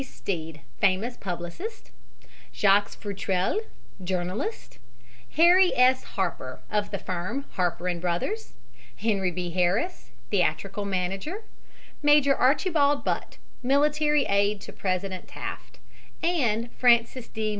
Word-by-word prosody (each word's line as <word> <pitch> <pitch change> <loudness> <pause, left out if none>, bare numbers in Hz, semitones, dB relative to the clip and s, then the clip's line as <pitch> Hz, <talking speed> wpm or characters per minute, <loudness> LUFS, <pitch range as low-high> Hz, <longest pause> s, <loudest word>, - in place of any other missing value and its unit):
Stead. 165 - -5 0.2
famous 200 +5 +2
publicist; 185 - -6 0.6
Jacques 200 0 +4
Futrelle, 195 - -1 0.4
journalist; 185 - -3 0.5
Henry 360 +4 +6
S. 255 +1 +5
Harper, 170 -9 -2
of 210 -1 0
the 200 - -3
firm 185 +8 -3
of - - -28
Harper 180 0 -1
& - - -7
Bros.; 180 - -2 0.4
Henry 200 -4 0
B. 175 0 -4
Harris, 185 - 0 0.2
theatrical 195 +2 0
manager; 195 - -3 0.6
Major 295 -2 +5
Archibald 290 +1 +3
Butt, - - -2 0.2
military 295 +2 +3
aide 200 +1 +2
to - - -10
President 185 0 -3
Taft; - - -7 0.5
and 240 -9 +1
Francis 235 0 +3
D. 220 -1 -2
205 Hz, 110 wpm, -26 LUFS, 185-280 Hz, 0.6 s, Henry